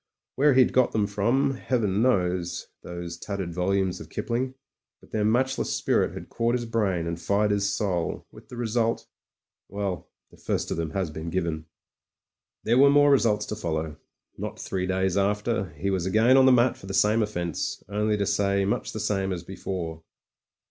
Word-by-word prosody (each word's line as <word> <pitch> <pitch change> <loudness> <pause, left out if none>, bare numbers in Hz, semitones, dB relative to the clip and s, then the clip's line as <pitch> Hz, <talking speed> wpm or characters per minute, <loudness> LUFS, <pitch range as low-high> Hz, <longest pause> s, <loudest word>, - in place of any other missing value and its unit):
Where 140 0 +4
he'd 130 -1 +5
got 130 -1 +3
them 105 -2 +2
from. 115 +8 +1
Heaven 110 -6 0
knows, 90 -7 0
those 85 -1 -7
tattered 95 -4 -4
volumes 95 +1 0
of - - -10
Kipling; 130 +2 -2 0.4
but - - -21
their 110 - 0
matchless 130 +5 +1
spirit - - +1
had - - -8
caught 115 +1 0
his 120 -1 -2
brain 100 -7 0
and 85 0 -4
fired 105 +1 +1
his 100 0 +1
soul, 95 -5 -2
with - - -16
the 125 - -9
result 115 -1 0 0.3
— - - -67
well, 100 -3 -4 0.2
the - - -18
first - - -2
of - - -1
them 80 -1 -2
has 90 0 -2
been 80 +2 -5
given. 85 -3 -2 1.0
There 120 +3 +3
were 140 +1 +7
more 145 0 +5
results 110 -6 +3
to - - -4
follow. 80 -6 -3 0.4
Not - - -5
three 90 -1 -3
days 95 0 0
after 105 0 0
he 100 +6 -1
was 95 -2 -1
again 110 +5 +3
upon 130 0 +7
the - - +7
mat 125 0 +4
for 95 - -12
the 95 - -3
same 105 +3 +3
offence, 85 -6 -3
only 105 +1 0
to 100 - 0
say 100 0 +1
much 100 - -2
the 110 - -4
same 100 -3 -1
as 90 -2 -4
before. 85 -3 -5
100 Hz, 185 wpm, -26 LUFS, 90-115 Hz, 1.0 s, were